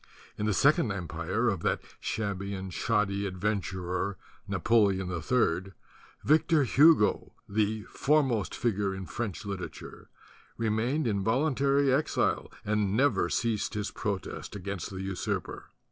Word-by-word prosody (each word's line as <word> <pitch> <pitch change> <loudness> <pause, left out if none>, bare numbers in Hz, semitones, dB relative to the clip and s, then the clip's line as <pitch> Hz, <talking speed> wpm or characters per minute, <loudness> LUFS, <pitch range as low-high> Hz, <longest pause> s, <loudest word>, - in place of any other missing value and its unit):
In 105 - -2
the - - +2
Sec 145 - +5
ond 120 -10 0
Empire 90 +5 -2
of 100 -6 +1
that - - +1 0.2
shabby 100 -2 -3
and 95 -1 -6
shoddy 100 -2 0
adven 100 +2 -1
turer, 90 +1 -3 0.3
Napoleon 100 -5 +2
III, 90 0 0 0.5
Victor 155 0 +4
Hugo, 140 -3 +4
the 105 +1 0
foremost 135 -7 +1
figure 100 -4 0
in 95 0 -6
French 105 -3 -4
literature, 100 -2 -7 0.5
remained 115 +7 0
in 100 -4 0
volun 135 +7 +1
tary 140 0 +3
exile 150 +4 0
and 105 -1 +1
never 145 +3 +3
ceased 115 -4 -1
his 105 0 -2
protest 100 -1 -4
against 100 -3 -5
the 95 -1 -6
usurper. 95 -2 -3
105 Hz, 130 wpm, -29 LUFS, 95-120 Hz, 0.5 s, Sec